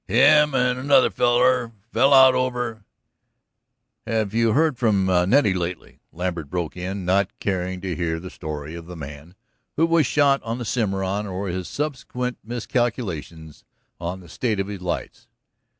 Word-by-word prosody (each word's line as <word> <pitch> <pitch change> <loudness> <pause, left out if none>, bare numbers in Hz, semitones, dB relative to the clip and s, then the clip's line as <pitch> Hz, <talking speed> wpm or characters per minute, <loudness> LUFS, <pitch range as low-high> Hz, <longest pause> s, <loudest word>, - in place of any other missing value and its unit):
Him 150 +7 +5
and 125 0 +1
another 135 0 +4
feller 125 0 +2 0.2
fell 135 +5 +4
out 130 -1 +8
over 125 -4 -2 0.6
" - - -40
"Have 110 -3 -1
you 115 -1 +2
heard 150 -1 +2
from 105 -5 +2
Nettie 95 +6 +3
lately?" 90 -1 -5
Lambert 85 -4 -4
broke 90 -3 -3
in, 95 +1 -5
not 95 +1 +2
caring 95 -1 -2
to 95 -3 -3
hear 80 0 -2
the 90 +2 -9
story 75 -1 -6
of 85 0 -9
the 90 - -8
man 75 +3 -10 0.4
who 160 - +3
was 165 -4 +3
shot 140 -1 +3
on 115 +1 -4
the 120 - -5
Cimarron, 100 -2 -1
or 95 +1 -4
his 90 0 -4
subsequent 125 -4 -4
miscalculations 105 - -3 0.4
on 90 +2 -5
the 85 - -14
state 110 +3 -2
of 95 - 0
his 100 -2 -7
lights. 90 -1 -5
100 Hz, 160 wpm, -23 LUFS, 90-125 Hz, 0.6 s, out